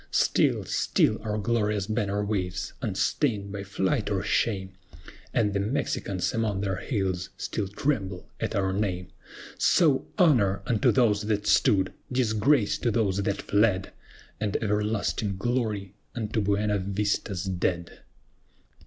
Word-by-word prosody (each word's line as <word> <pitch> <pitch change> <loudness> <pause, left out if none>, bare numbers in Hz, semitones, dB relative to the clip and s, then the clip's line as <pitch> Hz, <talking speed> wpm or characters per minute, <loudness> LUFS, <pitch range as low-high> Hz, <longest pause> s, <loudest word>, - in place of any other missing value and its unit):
Still, - - +2
still - - +1
our 105 -1 -2
glorious 105 -2 0
banner 105 -1 -1
waves, 95 -3 -2
unstained 100 +1 0
by 100 -1 -4
flight 95 -1 -1
or - - -1
shame, 95 -4 0 0.6
And 105 -4 +1
the 100 - 0
Mexicans 100 -5 -1
among 110 -4 0
their 95 -2 -1
hills 95 -7 -2
still 100 - -3
tremble 100 -4 -2
at - - -2
our 95 -1 +1
name. 90 -3 -2 0.5
SO, 155 -7 +3
HONOR 120 - +3
UNTO 110 -4 +3
THOSE 110 -5 +3
THAT 105 -1 0
STOOD! 95 -3 +3 0.2
DISGRACE 120 0 +2
TO 120 - +1
THOSE 100 -4 +1
THAT 100 0 -2
FLED! 100 -2 +2 0.5
AND 105 -2 -1
EVERLASTING 105 -1 -1
GLORY 105 -4 -1 0.2
UNTO 110 -2 -1
BUENA 105 +1 +1
VISTA'S 100 -1 -1
DEAD! 90 -2 -2
105 Hz, 125 wpm, -27 LUFS, 95-110 Hz, 0.6 s, SO